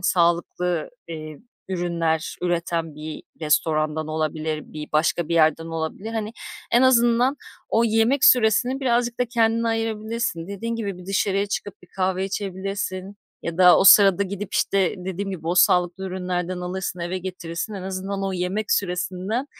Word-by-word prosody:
sağlıklı, 175 -1 +1 0.2
eee, 155 -2 -7 0.3
ürünler 170 -3 -1
üreten 170 -2 -1
bir 155 +1 -7 0.2
restorandan 155 0 +1
olabilir, 155 0 -2
bir 150 0 -8
başka 160 +1 +1
bir 170 - 0
yerden 160 0 +3
olabilir. 165 +7 -4
Hani, 220 -1 -3 0.4
en 240 - +5
azından 245 +1 +4 0.3
o 230 +1 +3
yemek 225 +5 +2
süresini 250 +3 +4
birazcık 240 -2 +1
da 250 - +4
kendine 230 -1 +1
ayırabilirsin. 225 -5 -2
Dediğin 230 +4 -4
gibi 200 -5 -4
bir 180 - -12
dışarıya 195 0 +1
çıkıp 205 -1 -5
bir 180 - -16
kahve 190 0 0
içebilirsin 195 0 -4 0.3
ya 170 0 -5
da 180 -1 +8
o - - +3
sırada 195 -1 +8
gidip, 200 +1 -5
işte, 195 -2 +2
dediğim 190 +2 -4
gibi 170 -4 -7
o 175 - +1
sağlıklı 180 +1 +3
ürünlerden 180 -1 -3
alırsın, 180 0 -4
eve 175 +2 -3
getirirsin, 180 +2 -5
en 190 - -6
azından 195 +1 -4
o 195 - -1
yemek 185 +4 -1
süresinden 190 +6 -1
185 Hz, 150 wpm, -23 LUFS, 170-215 Hz, 0.4 s, da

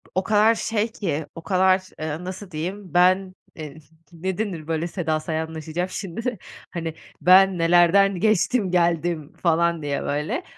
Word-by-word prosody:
o 185 - +1
kadar 220 +1 +4
şey 225 0 -1
ki, 160 -8 -3
o 165 - -8
kadar, 185 0 +3 0.2
ııı, 160 +3 -4
nasıl 185 +1 -7
diyeyim, 180 +4 -6
ben, 185 +1 +3 0.2
eee, 155 -1 -8 0.4
ne 185 +3 -4
denir, 180 -8 -4
böyle, 165 +1 -1
Seda 160 -3 -2
Sayanlaşacağım 160 +2 -4
şimdi. 215 +6 -4 0.3
Hani, 165 -3 -4 0.3
"Ben 185 +1 +6
nelerden 175 +3 +4
geçtim, 215 -1 +1
geldim." 170 -3 0
falan 170 -1 +2
diye, 145 -1 -2
böyle. 150 - -2
175 Hz, 140 wpm, -23 LUFS, 160-195 Hz, 0.4 s, Ben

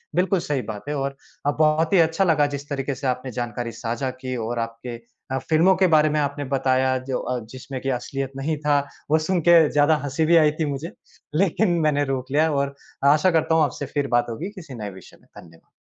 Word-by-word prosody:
बिल्कुल 185 +1 +2
सही 145 -5 -2
बात 105 -1 -6
है 150 - -1
और 140 0 -2 0.3
अ, 145 - +3
बहुत 155 +3 +2
ही 190 - +6
अच्छा 165 +4 +3
लगा 155 -5 +3
जिस 140 +1 -8
तरीके 140 -1 -2
से 135 +2 -4
आपने 125 0 -2
जानकारी 120 0 -4
साझा 120 +3 -2
की 130 -1 -3
और 115 +1 -3
आपके 115 +1 -8 0.4
अ, 135 - 0
फिल्मों 170 +4 +5
के 185 0 +3
बारे 150 0 +4
में 150 - 0
आपने 145 0 -2
बताया 130 0 +2
जो 130 - 0
अ, 125 0 -2
जिसमें 130 +3 -8
कि 135 - -2
असलियत 135 +2 -5
नहीं 155 +3 -1
था। 145 -1 +4 0.3
वो 155 - +6
सुन 175 +3 0
के 165 -3 +7
ज़्यादा 150 +2 +4
हँसी 145 +3 0
भी 170 +2 +4
आई 155 -2 +5
थी 160 - +1
मुझे, 145 +5 -5 0.4
लेकिन 190 +2 +2 0.2
मैंने 145 -1 +2
रोक 130 0 -5
लिया। 155 +3 +3
और 140 -1 -1 0.4
आशा 155 +5 +3
करता 160 -1 +2
हूँ 160 - +4
आपसे 140 0 -2
फिर 145 -1 +1
बात 120 - +2
होगी 155 - -5
किसी 160 -9 -9
नए 105 -3 -5
विषय 95 -2 -14
पे, - - -26
धन्यवाद। 80 -1 -19
145 Hz, 225 wpm, -23 LUFS, 130-160 Hz, 0.4 s, के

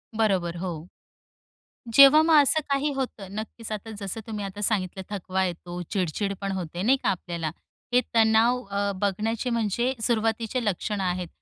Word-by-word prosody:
बरोबर, 190 -6 +1
हो. 170 -2 -5 1.1
जेव्हा 275 +2 +9
मग 320 -1 +5
असं 315 +3 +3
काही 280 +2 +1
होतं, 255 -7 -4
नक्कीच. 220 +1 -6
आता 215 +1 -5
जसं 200 +2 -4
तुम्ही 210 -2 -4
आता 195 +1 -7
सांगितलं 190 -3 0
थकवा 190 -1 -1
येतो, 175 0 -5
चिडचिड 195 +2 -1
पण 195 -1 -2
होते 175 -1 -4
नाही 260 +6 +4
का - - +1
आपल्याला? 170 -3 -3 0.4
हे 250 - +5
तणाव 225 +3 +4
अं 200 -1 -1
बघण्याचे 215 +5 -1
म्हणजे 235 +2 0
सुरुवातीचे 225 +1 0
लक्षणं 205 0 -1
आहेत. 180 -1 -2
205 Hz, 150 wpm, -26 LUFS, 185-230 Hz, 1.1 s, जेव्हा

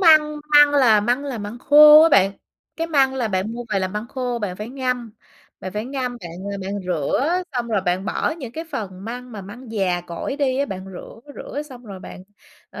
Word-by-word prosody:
măng 310 -4 +5 0.2
măng 295 0 +8
là 250 -7 +5
măng 245 +6 0
là 265 -5 -4
măng 210 +3 -6
khô 300 +3 +8
á 325 - +6
bạn, 195 - +4 0.4
cái 330 0 -2
măng 275 -4 +2
là 245 -4 -1
bạn 190 +2 -2
mua 240 +1 -6
về 200 - +2
là 190 -1 -1
măng 210 +4 -5
khô 250 -2 -3
bạn 200 -5 -4
phải 210 +3 -6
ngâm, 250 -3 -3 0.5
bạn 185 - -6
phải 210 +2 -3
ngâm 255 -1 -4
bạn, 170 - -8 0.2
ơ, 200 - -5
bạn 190 0 -5 0.2
rửa 260 - 0
xong 240 -2 -2
rồi 215 -4 +1
bạn 185 0 -1
bỏ - - -1
những 250 -6 -7
cái 325 +4 -6
phần 195 - -6
măng 245 +2 -7
mà 210 - -7
măng 220 +5 -11
già 185 -4 0
cỗi 175 +10 -5
đi 265 -3 0
á, 280 - +2
bạn 190 -5 -6
rửa, 185 - -11
rửa 290 - -6
xong 255 -4 -13
rồi 195 -4 -9
bạn, 185 - -10 0.5
ờ, - - -9
240 Hz, 230 wpm, -21 LUFS, 200-275 Hz, 0.5 s, măng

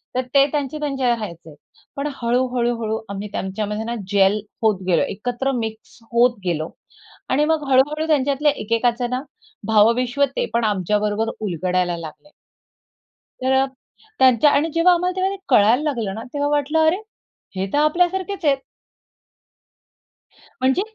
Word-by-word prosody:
तर 255 - +2
ते 275 0 +7
त्यांचे 295 0 -2
त्यांच्या 270 -4 -1
राहायचे. 170 -9 -4 0.4
पण 280 +1 -2
हळू, 245 +2 +1
हळू, 240 0 +1
हळू 220 0 -1
आम्ही 200 +1 -5
त्यांच्यामध्ये 210 +3 -3
ना 235 +1 -3 0.2
जेल 200 +1 +4 0.2
होत 210 -4 +2
गेलो. 170 -3 +3
एकत्र 245 +6 -2
मिक्स 225 -3 -5
होत 240 0 +3
गेलो 160 -2 -1 0.6
आणि 295 +3 +2
मग 315 -1 +1
हळू, 260 0 +7
हळू 310 +1 -2
त्यांच्यातले 285 0 +2
एकेकाच 235 +2 0
ना 255 +1 -2 0.5
भावविश्व 235 +5 +3
ते - - 0
पण 235 0 +1
आमच्याबरोबर 210 +2 0
उलगडायला 180 -2 -1
लागले. 165 - -10 1.1
तर 260 - +2 0.7
त्यांच्या 260 +2 +5
आणि 305 +3 +2
जेव्हा 345 +2 +5
आम्हाला 360 +1 0
तेव्हा 380 +1 0
ते - - -11
कळायला 240 +4 +5
लागलं 230 -10 -2
ना, 225 - -6
तेव्हा 290 0 0
वाटलं, 295 +2 +1
"अरे! 330 +4 +3 0.6
हे 190 +1 -1
तर - - +2
आपल्यासारखेच 360 +4 +1
आहेत." 275 -2 +4 2.0
म्हणजे 265 +8 +2
245 Hz, 145 wpm, -21 LUFS, 210-290 Hz, 2.0 s, ते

